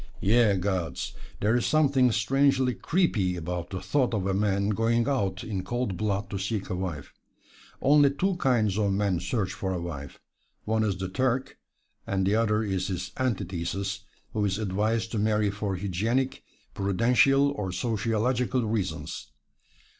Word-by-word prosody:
Ye 110 0 +4
gods! 95 -3 -2 0.3
there 110 +3 +3
is 120 - +1
something 140 -5 +4
strangely 130 +4 +2
creepy 110 - +1
about 90 0 -4
the 95 - -4
thought 130 -1 +1
of 95 -3 -1
a 95 - +1
man 100 0 +1
going 115 +2 +1
out 100 -9 -1
in 100 -4 -3
cold 120 -1 -2
blood 100 0 -1
to 100 - -3
seek 100 +1 -3
a - - 0
wife. 90 -6 -5 0.7
Only 145 +1 +6
two 185 +7 0
kinds 110 - +2
of 100 -2 +2
men 100 -3 +1
search 95 +1 -2
for 95 -2 -3
a 90 - -2
wife; 80 -5 -7 0.5
one 110 0 +1
is 100 -3 0
the 95 0 -3
Turk, 130 +6 -1 0.5
and 95 -1 0
the 100 - +2
other 110 -1 +2
is 95 -3 -1
his 90 -1 -4
antithesis, 100 -4 -2 0.3
who 105 - 0
is 100 -1 0
advised 110 +2 -1
to 110 - -1
marry 105 -1 +2
for 100 -1 -3
hygienic, 110 +8 -1 0.3
prudential 125 +8 +3
or 105 -9 -3
sociologic 115 +5 0
reasons. 100 - -2
105 Hz, 155 wpm, -27 LUFS, 95-120 Hz, 0.7 s, Only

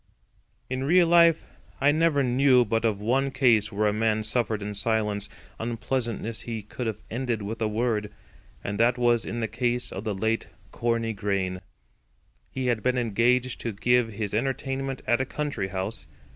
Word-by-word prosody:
In 130 +1 -3
real 175 +5 +5
life 170 -1 +5 0.3
I 145 - +4
never 155 -2 +2
knew 125 0 +4
but 115 +2 0
of 105 -3 +1
one 130 +6 +1
case 115 -6 +3
where 105 +1 0
a 105 - +2
man 110 0 +1
suffered 110 -1 -1
in 105 0 -4
silence 105 -1 -1 0.3
unpleasantness 115 -1 -2
he 115 -3 -5
could 115 +3 -5
have 110 - -4
ended 120 -2 -2
with 110 +3 -5
a 110 - +2
word; 105 -1 -1 0.5
and 100 0 -4
that 120 +2 +3
was 120 -1 +3
the 115 -1 -2
case 120 +3 -1
of 95 - -5
the 105 -3 -2
late 110 +3 -1 0.2
Corney 115 -1 -1
Grain. 95 -3 -2 0.9
He 130 -1 -4
had 120 -3 +1
been 125 +2 +1
engaged 120 +2 +1
to 115 - -3
give 120 +2 +2
his 105 -1 -4
entertainment 135 +2 -2
at 120 +2 +2
a - - +2
country 145 -8 -3
house. 95 -3 -4
115 Hz, 170 wpm, -26 LUFS, 105-125 Hz, 0.9 s, real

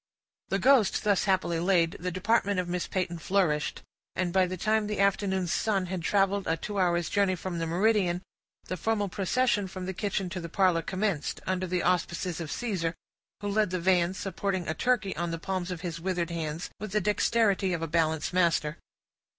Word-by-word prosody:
The 195 - +1
ghost 250 0 +4
thus 205 -2 +2
happily 185 -4 +1
laid, 170 -2 +3
the 180 - -2
department 200 +2 +1
of 180 - -2
Miss 175 0 -2
Peyton 175 -3 -2
flourished; 160 -4 0 0.3
and 180 -2 -1
by 190 -1 +4
the 185 +1 -4
time 215 +2 +1
the 210 -1 -3
afternoon's 190 -2 +1
sun 200 -4 +1
had 180 0 -4
traveled 195 +2 +1
a 160 - +1
two 205 +4 -4
hours' 175 -2 +2
journey 200 -2 +2
from 180 -1 -4
the 165 - -1
meridian, 185 0 +2 0.4
the 185 - -5
formal 205 +2 0
procession 205 +2 +1
from 185 0 -6
the 190 - -3
kitchen 195 0 -2
to 185 -1 -5
the 170 - -6
parlor 180 -1 +3
commenced, 190 -3 -2
under 185 0 -1
the 180 0 -1
auspices 175 -1 0
of 155 -3 -5
Caesar, 185 -9 -2 0.5
who 205 - -3
led 210 -1 +2
the 185 0 -2
van, 180 0 +2
supporting 190 -1 -2
a 160 - 0
turkey 215 +1 0
on 175 0 -2
the 165 - -3
palms 185 +1 -3
of 180 -3 -5
his 170 -2 -5
withered 175 -2 -1
hands, 160 0 -4
with 210 -1 -6
the 210 - +3
dexterity 205 -1 +2
of 170 -2 -2
a - - -1
balance 160 0 0
master. 170 -3 +1
185 Hz, 195 wpm, -28 LUFS, 170-200 Hz, 0.5 s, ghost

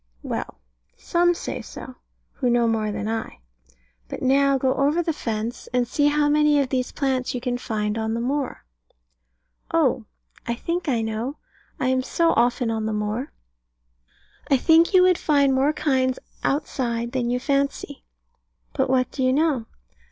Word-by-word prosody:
Well, - - -5 0.4
some 350 0 +2
say - - -5
so, 255 -1 -10 0.3
who 250 - -1
know 240 -1 +3
more 220 -2 0
than 210 - -4
I. 225 - -4 0.7
But - - -7
now 275 +1 +3
go 260 0 +1
over 290 +6 +1
the 325 - -1
fence, 225 -3 -4
and 245 -1 +2
see 290 +4 +2
how 295 0 +2
many 300 0 +4
of 275 -2 0
these 255 -1 -1
plants 260 -2 -1
you - - -1
can 245 0 -2
find 215 -2 -2
on 220 0 -1
the - - -2
moor. 270 - -2 1.1
Oh, - - +2 0.4
I 235 - 0
think 335 +5 -3
I 235 -4 +1
know. 225 +6 -3 0.4
I 255 - +1
am 260 0 +2
so 330 +5 +1
often 245 -1 +1
on 220 -1 -2
the 220 - -2
moor. 210 +6 -3 1.2
I 275 - +5
think 325 +6 +4
you 365 - +7
would 365 -1 +4
find 280 -3 +3
more 270 +3 +3
kinds 260 -4 0 0.3
outside 240 -5 -1
than 250 -2 -1
you 250 +1 0
fancy. 280 +1 -2 0.7
But 265 -2 0
what 255 -1 +2
do 270 - -5
you 255 0 +3
know? 280 -5 +1
260 Hz, 165 wpm, -23 LUFS, 235-290 Hz, 1.2 s, you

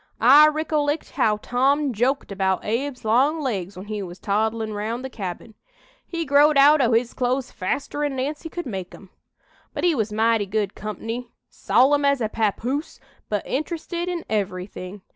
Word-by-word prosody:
I 280 +6 +8
ricollect 305 -1 -1
how 215 -6 +2
Tom 270 +5 +1
joked 250 +3 0
about 190 -1 0
Abe's 250 +3 -2
long 265 +9 +3
legs 200 - -3
when 185 - -8
he 210 -1 -4
was 180 -2 -7
toddlin' 220 +2 -1
round 225 +5 -3
the 265 - -6
cabin. 195 +1 -6 0.5
He 335 -1 -3
growed 290 +1 +5
out 290 +2 +7
o' 240 -2 +3
his 230 +1 +1
clothes 255 +1 -1
faster'n 285 +8 -2
Nancy 295 +5 -3
could 345 +2 -5
make 190 -7 -6
'em. 190 - -16 0.6
"But - - -3
he 350 -2 +4
was 220 -6 -1
mighty 220 -1 +2
good 205 0 -1
comp'ny, 225 +3 -5 0.2
solemn 285 +3 +3
as 280 -1 +3
a 220 -3 -1
papoose, 235 +7 -2 0.3
but 210 -2 -2
interested 340 +4 -3
in 350 -2 -4
everything. 185 -1 -4
245 Hz, 160 wpm, -23 LUFS, 210-285 Hz, 0.6 s, I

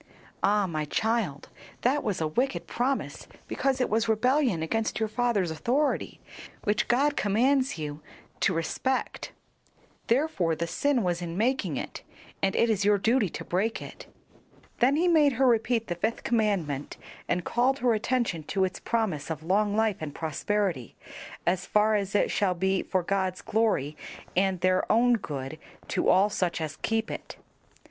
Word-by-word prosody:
"Ah, 205 0 +3
my 155 -4 -2
child, 215 -5 -1 0.3
that 275 +4 +2
was 205 -4 -1
a 160 - 0
wicked 250 - -1
promise 260 +3 -2 0.2
because 270 -1 0
it 255 - +2
was 225 +1 0
rebellion 245 - +2
against 220 +8 -1
your 220 - +1
father's 215 -6 0
authority, 245 - 0 0.4
which 210 0 +1
God 280 +4 +2
commands 260 +5 +2
you 150 -1 -5 0.4
to - - +2
respect. 185 +10 -2 0.8
Therefore 230 - +1
the 170 - -2
sin 260 +7 +1
was 175 -1 -1
in 170 0 -5
making 215 - 0
it, - - -6 0.4
and 195 0 +1
it 230 - +3
is 210 -3 +1
your 205 0 +4
duty 225 0 +2
to - - -7
break 205 +6 0
it." - - -10 0.7
Then 260 +4 +4
he 340 +4 +2
made 305 -5 +5
her 265 +3 +2
repeat 230 -1 +2
the 175 - -2
fifth 215 +7 -2
commandment, 195 - -1 0.3
and 175 0 0
called 255 +3 +2
her 245 -3 +2
attention 220 -5 0
to 190 +3 0
its 185 - -5
promise 200 -12 -1
of 160 -1 -4
long 205 +4 +1
life 220 -2 +2
and 150 -2 -6
prosperity, 165 - -2 0.5
as 180 +1 0
far 210 +1 +3
as 200 -1 -1
it - - +2
shall 190 -3 +1
be 190 +2 +1
for 185 -1 -1
God's 190 0 -1
glory 205 -10 0 0.4
and 190 -1 +1
their 185 0 +2
own 240 +2 +4
good, 145 - -4 0.3
to - - +1
all 200 +3 +4
such 180 -4 -1
as 155 -1 -4
keep 225 0 -1
it. - - -7
210 Hz, 165 wpm, -27 LUFS, 175-240 Hz, 0.8 s, made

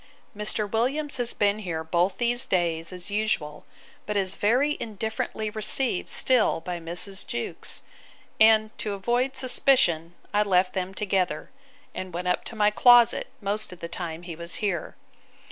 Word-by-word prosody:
Mr. 210 0 -1
Williams 265 +8 0
has 240 -1 +2
been 205 0 +1
here 170 -6 -4
both 175 +4 0
these 240 +1 +1
days, 170 -2 0
as 180 +2 -7
usual; 205 -8 -2 0.4
but 210 -1 -1
is 190 -1 +2
very 255 +10 +2
indifferently 220 0 -4
received 220 +1 +1
still 250 -9 +3
by 175 +1 -5
Mrs. 175 +4 -4
Jewkes; 120 - -5 0.6
and, 220 0 +5
to 210 - -2
avoid 240 +7 -1
suspicion, 175 -11 +3 0.2
I 205 - +3
left 185 -3 +2
them 190 0 -3
together, 185 -5 -1 0.4
and 185 -2 -6
went 180 +1 -2
up - - 0
to 235 - -6
my 210 -1 +3
closet, 240 +1 +5
most 205 +1 -1
of 180 - -11
the 170 - -5
time 170 -1 -5
he 170 -2 -7
was 170 +1 -2
here. 195 -6 -3
200 Hz, 155 wpm, -26 LUFS, 175-220 Hz, 0.6 s, and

